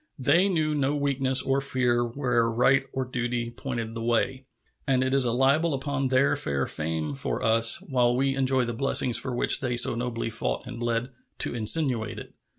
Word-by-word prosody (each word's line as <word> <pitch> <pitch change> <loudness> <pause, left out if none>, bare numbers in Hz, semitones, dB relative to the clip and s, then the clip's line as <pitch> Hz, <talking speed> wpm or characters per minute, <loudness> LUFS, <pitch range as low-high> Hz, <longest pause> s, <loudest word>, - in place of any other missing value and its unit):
They 175 +9 +2
knew 155 -4 0
no 145 0 0
weakness 135 -2 +1
or 135 +1 0
fear 125 -3 0
where 120 -1 0
right 135 +4 +2
or 130 0 -3
duty 120 -1 -3
pointed 120 -2 -5
the 115 - -6
way, 120 +3 -1 0.4
and 130 -1 +2
it 130 0 -1
is 135 -2 +4
a 120 - +1
libel 140 +6 +2
upon 140 0 -2
their 130 +2 +2
fair 70 -1 0
fame 80 -1 -3
for - - -3
us, 115 0 +3
while 125 -3 +1
we 135 +1 +1
enjoy 130 -1 +1
the 120 - -4
blessings 125 -1 +2
for 125 - -4
which - - +2
they 125 -2 -2
so 120 - +4
nobly 115 -1 -4
fought - - -3
and 120 -1 -8
bled, 120 +1 -2 0.3
to - - -2
insinuate 120 0 +1
it. - - -10
125 Hz, 190 wpm, -26 LUFS, 115-135 Hz, 0.4 s, is